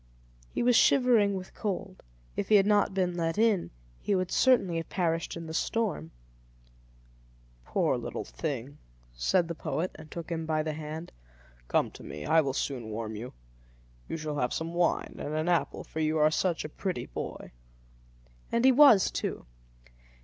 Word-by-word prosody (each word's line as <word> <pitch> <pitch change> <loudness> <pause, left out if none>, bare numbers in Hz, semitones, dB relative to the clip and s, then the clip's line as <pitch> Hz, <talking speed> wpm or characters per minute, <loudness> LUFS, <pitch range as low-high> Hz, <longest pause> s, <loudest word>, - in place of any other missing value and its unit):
He - - -2
was 245 0 +4
shivering 230 -6 +5
with 185 -1 -7
cold; 195 -2 -4 0.3
if - - -3
he 215 - +6
had 195 -1 +6
not 205 -2 +3
been 180 -2 0
let 165 0 -1
in, 215 -5 +2 0.3
he 200 - 0
would 185 -1 -1
certainly 200 -10 +3
have 165 - -4
perished 165 -2 -1
in 165 - -7
the 160 - -7
storm. 205 - -1 1.6
"Poor - - +1
little - - -5
thing!" 130 - -5 0.3
said 170 - +1
the 170 - -3
poet, 165 +2 -3
and 155 0 -12
took 170 +1 -7
him 165 -1 -3
by 155 -1 +1
the 155 0 -2
hand. 155 +2 -6 0.6
"Come - - +1
to - - -12
me; 75 - -7
I 160 0 +5
will 135 -3 -2
soon 125 -5 -3
warm 110 0 -4
you. 115 +4 -7 0.8
You - - -2
shall 150 -2 -3
have 125 - 0
some 165 +1 -3
wine 175 0 0
and 150 - -4
an 155 +2 -1
apple, 175 -2 0
for 160 - -7
you 155 0 +1
are 155 0 +4
such 170 +1 0
a - - -5
pretty 185 +3 -3
boy." - - -7 1.0
And 235 +2 +2
he 265 - +8
was, 255 - +7
too. - - -3
165 Hz, 175 wpm, -29 LUFS, 155-195 Hz, 1.6 s, he